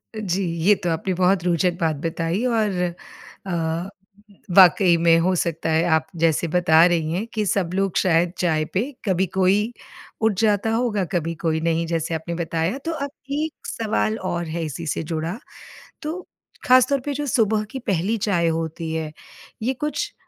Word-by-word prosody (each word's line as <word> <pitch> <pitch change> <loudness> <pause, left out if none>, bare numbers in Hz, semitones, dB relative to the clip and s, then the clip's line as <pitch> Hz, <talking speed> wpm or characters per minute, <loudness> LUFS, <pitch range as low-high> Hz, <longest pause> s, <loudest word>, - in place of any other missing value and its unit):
जी, 195 -2 -1 0.2
ये 205 0 +6
तो 175 - -3
आपने 165 +3 -1
बहुत 180 0 +2
रोचक 175 0 +1
बात 160 -2 +1
बताई 165 +6 -1
और 215 -6 +1 0.7
अ, 170 +1 -2 0.7
वाक़ई 180 -1 +7
में 165 0 +4
हो 185 +2 +2
सकता 165 -1 -1
है 160 +1 +3
आप 160 0 -1
जैसे 165 0 +2
बता 165 -1 +5
रही 165 -3 +1
हैं 200 +6 -2
कि 215 -2 -1
सब 180 -3 0
लोग 195 -1 0
शायद 170 -1 +2
चाय 160 -3 +1
पे 190 - +2 0.2
कभी 190 -1 +2
कोई 200 +5 +2 0.5
उठ 220 -1 +3
जाता 215 0 +2
होगा, 225 -4 0
कभी 165 -2 -2
कोई 160 0 -1
नहीं 165 0 0
जैसे 165 0 -2
आपने 165 +2 -4
बताया 165 +6 -1
तो 330 - -1
अब 280 -3 -3 0.2
एक 305 +2 -3
सवाल 220 0 -1
और 175 0 -3
है 165 +1 -3
इसी 155 +2 -6
से 160 - -2
जुड़ा, 165 +5 -3 0.6
तो 325 +4 -5 0.4
ख़ासतौर 255 +2 +5
पे 290 - -1
जो 295 +1 -3
सुबह 220 -3 +2
की 265 - -5
पहली 205 0 -1
चाय 185 -5 +1
होती 165 0 -2
है, 160 -1 -3 0.5
ये 260 +3 +1
कुछ 295 +4 -3
180 Hz, 170 wpm, -22 LUFS, 165-215 Hz, 0.7 s, वाक़ई